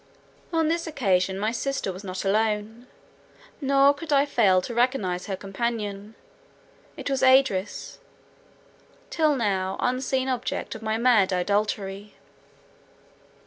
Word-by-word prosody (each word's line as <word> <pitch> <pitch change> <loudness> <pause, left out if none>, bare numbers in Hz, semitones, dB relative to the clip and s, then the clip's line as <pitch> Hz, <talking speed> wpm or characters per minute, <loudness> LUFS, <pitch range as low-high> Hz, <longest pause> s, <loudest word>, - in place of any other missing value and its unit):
On 325 -2 +1
this 335 +1 -1
occasion, 190 - 0
my 215 +3 -1
sister 245 -5 -2
was 185 +3 -10
not 185 0 -5
alone; 215 +3 -1 0.7
nor 275 0 +4
could 305 +2 -8
I 280 0 +4
fail 205 -10 +3
to 235 - -6
recognise 230 -8 0
her 195 - -2
companion: 205 +1 -4 0.8
it - - -6
was 270 -1 -1
Idris, 260 -7 +2
the - - -31 0.2
till 310 -3 +2
now 195 -5 -1
unseen 260 +1 0
object 260 +2 -3
of 220 - -9
my 220 0 -1
mad 225 -5 +4
idolatry. 200 +1 -2
225 Hz, 125 wpm, -25 LUFS, 195-265 Hz, 0.8 s, nor